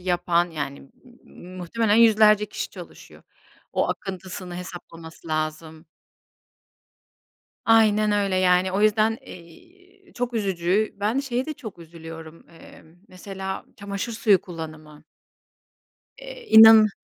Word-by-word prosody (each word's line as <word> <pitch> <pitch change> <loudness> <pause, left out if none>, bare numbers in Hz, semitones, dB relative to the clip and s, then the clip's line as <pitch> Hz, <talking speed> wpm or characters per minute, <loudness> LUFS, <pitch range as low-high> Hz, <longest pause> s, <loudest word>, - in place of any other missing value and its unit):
yapan, 175 -1 0
yani, 140 -3 -7 0.3
muhtemelen 185 +5 -3
yüzlerce 215 -2 +5
kişi 210 - -6
çalışıyor. - - -13 0.5
O - - 0
akıntısını 185 -2 -6
hesaplaması 170 -2 -11
lazım. 155 +1 -4 1.8
Aynen 215 -2 +3
öyle, 200 -2 0
yani, 185 0 +2
o 195 - -1
yüzden, 215 +1 +2
eee, 370 - -17
çok 245 0 -4
üzücü. 195 0 -1
Ben, 215 +6 0
şeye 260 -2 -2
de 310 - -5
çok 230 -11 -10
üzülüyorum, 165 -1 -12
eee, 165 - -16 0.2
mesela, 190 +1 -7
çamaşır 200 +3 -5
suyu 210 -4 +3
kullanımı. 155 -3 -10 1.2
Eee, - - -11
inan 220 -1 +9
190 Hz, 105 wpm, -23 LUFS, 170-220 Hz, 1.8 s, inan